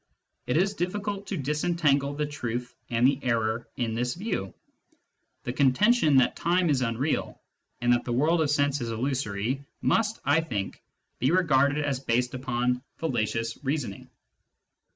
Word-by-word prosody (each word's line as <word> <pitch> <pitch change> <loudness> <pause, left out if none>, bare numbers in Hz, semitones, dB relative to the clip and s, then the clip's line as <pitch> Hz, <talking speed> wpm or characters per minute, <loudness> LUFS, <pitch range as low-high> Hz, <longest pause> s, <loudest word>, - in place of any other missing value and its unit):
It 125 - +1
is 195 +4 +2
difficult 200 +2 -3
to 195 - -3
disentangle 145 -1 +1
the 150 +1 -1
truth 125 -4 -4 0.2
and 120 +1 +2
the 135 +1 +3
error 115 -2 0
in 115 -3 -1
this 125 +2 -1
view. 180 - -3 0.9
The 125 - -3
contention 150 - +4
that 130 - +4
time 175 -1 +2
is 135 -3 +1
unreal 125 +5 -1 0.4
and 120 0 +4
that 120 - +1
the 120 - -4
world 155 +7 +2
of 155 - +1
sense 145 -1 +1
is 120 - -3
illusory 125 0 -2 0.2
must, 225 -1 +1
I 145 +4 +4
think, 105 -12 -4 0.4
be 130 - +2
regarded 145 -4 +3
as 140 -3 -1
based 125 -1 0
upon 125 -1 -1 0.2
fallacious 115 -5 -2
reasoning. 135 -8 -3
135 Hz, 150 wpm, -27 LUFS, 120-155 Hz, 0.9 s, contention